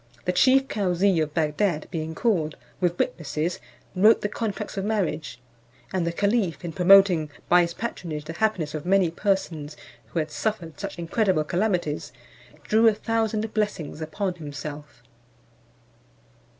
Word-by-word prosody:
The 180 - +2
chief 265 +8 +4
Cauzee 190 -2 +1
of 150 -1 -3
Bagdad 160 +1 0
being 160 -1 -4
called, 165 -10 0 0.2
with 175 -1 0
witnesses, 165 +1 -2 0.4
wrote 210 +5 +5
the 205 - -1
contracts 210 -1 -4
of 195 - -2
marriage; 185 - -2 0.5
and 180 -3 0
the - - +1
caliph 195 - 0
in 165 - -5
promoting 180 -2 +6 0.2
by 175 0 +6
his 170 -1 -2
patronage 165 -10 -5
the 165 - -6
happiness 170 -6 0
of 155 -1 -4
many 185 -2 +3
persons 165 -6 -2 0.3
who - - -7
had 155 -1 -1
suffered 170 -5 -3
such 200 -2 -5
incredible 175 0 +1
calamities, 175 -3 -1 0.5
drew 220 +2 +4
a 220 - +5
thousand 220 0 -1
blessings 200 -8 -2
upon 180 +5 -2
himself. 150 -4 -8
180 Hz, 140 wpm, -25 LUFS, 155-205 Hz, 0.5 s, promoting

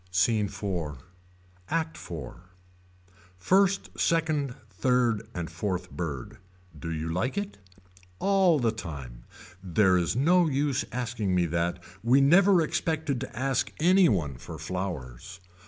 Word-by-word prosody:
SCENE 105 +3 +2
IV. 90 -8 -4 0.7
ACT 160 0 -1
IV. 75 -7 -7 1.0
First 195 - +2
second 155 -6 +1
third 120 +1 +1
and 85 -2 -3
fourth 90 +2 -3
bird. 75 -8 -5 0.4
Do 80 - -5
you 80 0 -3
like 100 - -1
it. 205 - -4 0.6
All 195 - +3
the 120 -5 +1
time. 70 - -8 0.4
There 95 0 +3
is 85 +1 -1
no 170 +7 +4
use 140 -1 0
asking 115 -6 -2
me 90 -1 +3
that. 85 +1 -1 0.2
We 125 +4 +5
never 175 +5 +5
expected 160 -4 -1
to 125 -4 -7
ask 130 0 0
any 180 +3 +5
one 75 - -1
for 80 +5 -9
flowers. 90 0 -5
110 Hz, 125 wpm, -27 LUFS, -, 1.0 s, We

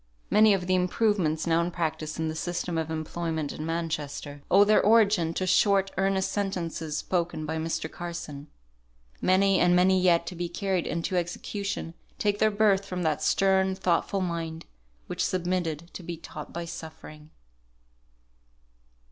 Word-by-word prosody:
Many 215 -1 +6
of 180 -2 -3
the 185 - +1
improvements 180 -3 +1
now 165 0 +3
in 170 - -1
practice 160 -3 -3
in 160 0 -1
the 155 - -2
system 175 +1 -3
of 160 -1 -1
employment 160 -1 -3
in 155 - -5
Manchester, 155 -3 -4
owe 195 +2 +7
their 215 +1 +4
origin 205 -6 +4
to 185 - -1
short, 195 +1 +3
earnest 195 0 +1
sentences 170 -6 -3
spoken 170 -3 -2
by 160 +1 -3
Mr. 160 0 -2
Carson. 160 -4 -7 0.7
Many 190 0 +3
and 175 0 +4
many 185 +1 +4
yet 170 -2 +3
to 180 +1 -6
be 175 0 -3
carried 185 0 -1
into 170 +3 -2
execution, 180 +1 -3 0.2
take 205 -1 0
their 215 - +4
birth 205 -2 +3
from 180 -2 -4
that 155 -2 0
stern, 190 -1 +2
thoughtful 185 +2 0
mind, 165 -2 -4 0.4
which - - -2
submitted 175 -3 -2
to - - -7
be 170 -1 -6
taught 155 -1 -9
by 170 0 -5
suffering. 155 -2 -10
175 Hz, 155 wpm, -27 LUFS, 160-190 Hz, 0.7 s, owe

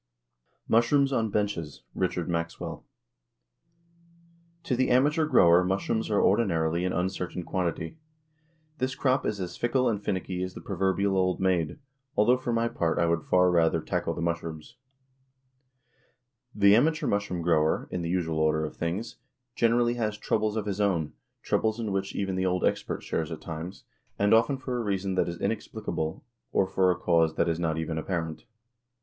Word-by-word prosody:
MUSHROOMS 135 +5 +3
ON 115 -3 +1
BENCHES. 100 - -2
RICHARD - - -1
MAXWELL. 85 -1 -4 1.8
To 130 - 0
the 130 +1 +1
amateur 150 +5 +3
grower 85 - +6
mushrooms 100 +5 -1
are 105 - +2
ordinarily 85 -5 +2
an 90 - 0
uncertain 90 0 -2
quantity. 85 - -3 0.8
This 130 0 -1
crop 130 0 +1
is 105 - -2
as 90 -2 -5
fickle 125 +2 +1
and 105 -3 -1
finicky 95 -2 -2
as 90 0 -4
the - - -7
proverbial 95 +1 0
old 95 -1 +1
maid 90 - +1 0.4
although, 120 +5 +5
for 125 -1 -3
my 115 0 +1
part, 85 -7 -1
I 85 - +3
would 85 -1 +1
far 90 +2 +3
rather 85 -2 +3
tackle - - -2
the - - -3
mushrooms. 85 +4 -4 1.8
The 100 -1 +6
amateur 155 +7 +2
mushroom 100 -4 -1
grower, 80 -2 +2
in 90 - -2
the 85 - -3
usual 85 -3 -1
order 80 0 +2
of - - -7
things, 90 +7 -3 0.4
generally 120 +1 +2
has 105 -1 -1
"troubles 110 0 0
of 110 -2 -2
his 100 0 -2
own," 85 -7 0 0.3
troubles 110 +1 0
in 110 -3 -2
which 95 0 -2
even 95 -2 -1
the 95 0 0
old 90 0 +1
expert - - -1
shares 80 -1 -2
at 80 - -5
times, 85 +3 -7 0.3
and 100 +1 +3
often 115 +5 +4
for 130 -1 -4
a - - -2
reason 100 -2 -1
that 95 - +1
is 85 - -6
inexplicable, 80 +3 -3 0.3
or 95 - +3
for 95 0 +2
a 90 - +2
cause 85 -3 +2
that - - +1
is 85 0 0
not 80 -2 -1
even 80 0 -2
apparent. 80 -2 -4
95 Hz, 165 wpm, -27 LUFS, 85-110 Hz, 1.8 s, grower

